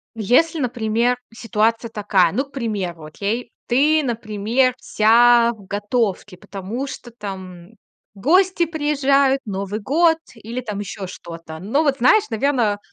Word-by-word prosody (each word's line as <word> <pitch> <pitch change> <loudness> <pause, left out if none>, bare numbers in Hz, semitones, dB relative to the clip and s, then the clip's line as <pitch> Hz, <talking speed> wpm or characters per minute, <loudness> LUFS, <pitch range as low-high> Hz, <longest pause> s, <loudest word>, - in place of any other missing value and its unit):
Если, 255 - +2
например, 240 -2 0 0.2
ситуация 225 0 0
такая. 195 -6 +2
Ну, 260 +7 0
к 275 - -24
примеру, 200 - -4
окей. 210 +9 -4
Ты, 300 +5 +3
например, 235 +1 0
вся 235 +2 +4
в 210 -4 -15
готовке, 205 -1 -2
потому 205 +8 -6
что, 250 -2 -9
там, 190 -5 -8 0.5
гости 350 - +3
приезжают, 280 -4 +1
Новый 200 -1 -4
год 325 - +3 0.2
или 230 +2 -6
там 210 -3 -5
еще 200 -1 -6
что-то. 165 -3 -9
Ну 225 - 0
вот 280 -3 +1
знаешь, 325 - +5
наверно 225 -3 +1
230 Hz, 130 wpm, -20 LUFS, 205-270 Hz, 0.5 s, знаешь